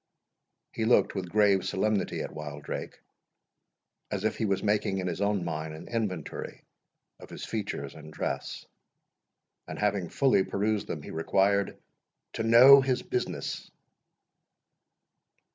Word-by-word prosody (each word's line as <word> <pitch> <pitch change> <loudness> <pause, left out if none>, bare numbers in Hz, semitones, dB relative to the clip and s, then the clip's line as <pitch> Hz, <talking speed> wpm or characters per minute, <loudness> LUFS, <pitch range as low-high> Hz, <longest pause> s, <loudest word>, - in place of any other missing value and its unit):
He - - -3
looked 120 - +4
with 95 -3 -4
grave 100 -1 +3
solemnity 105 +1 0
at - - -6
Wildrake, 75 -1 -6 1.1
as 100 -1 -3
if 110 - 0
he 110 - 0
was 100 -2 0
making 105 -2 +1
in 95 - -2
his 90 +1 -3
own 100 -3 0
mind 80 -1 -4
an 80 - -10
inventory 105 -9 -4 0.6
of - - -12
his - - -7
features 95 -10 -4
and 75 0 -12
dress; - - -4 1.0
and - - -6
having 100 -4 0
fully 135 -8 +3
perused 105 +1 -1
them, 75 - -5
he - - -8
required 100 +4 +1 0.6
"to - - -3
know 125 +5 +8
his 130 -1 0
business." 375 0 -3
100 Hz, 130 wpm, -28 LUFS, 85-110 Hz, 1.1 s, know